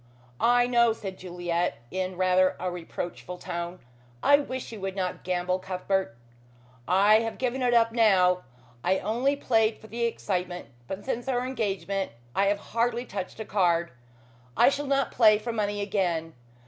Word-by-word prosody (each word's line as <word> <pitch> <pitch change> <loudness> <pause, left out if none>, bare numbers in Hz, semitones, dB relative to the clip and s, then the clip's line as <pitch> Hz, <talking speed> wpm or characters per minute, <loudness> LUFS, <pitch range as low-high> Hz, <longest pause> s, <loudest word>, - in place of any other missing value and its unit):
"I 245 +1 +4
know," 235 -2 +4
said 195 -4 -7
Juliet 175 -1 -2
in 185 0 -3
rather 185 0 +3
a 180 0 -2
reproachful 175 +1 -6
tone. 175 0 -5 0.5
"I 285 - +7
wish 260 -4 -5
you 220 -3 -8
would 195 0 -3
not 185 -2 -3
gamble, 180 0 0
Cuthbert." 185 -7 -2 0.7
"I 200 +4 +5
have 225 -1 -3
given 255 +1 -1
it 245 -1 +3
up 230 -1 +4
now. 190 -6 +4 0.4
I 190 - +2
only 240 +9 0
played 225 -5 +2
for - - -16
the 235 +2 -2
excitement, 180 -5 -3 0.2
but 190 +5 -6
since 245 -1 -3
our 250 -1 0
engagement 200 - -2 0.2
I 195 +1 +3
have 205 +1 +2 0.2
hardly 235 +1 +1
touched 195 -1 -6
a 220 - -4
card. 175 -4 +1 0.7
I - - +7
shall 285 +1 -3
not 275 -1 +1
play 215 -3 +6
for 230 +3 -4
money 205 -2 -1
again. 175 -5 -1
200 Hz, 160 wpm, -27 LUFS, 180-235 Hz, 0.7 s, I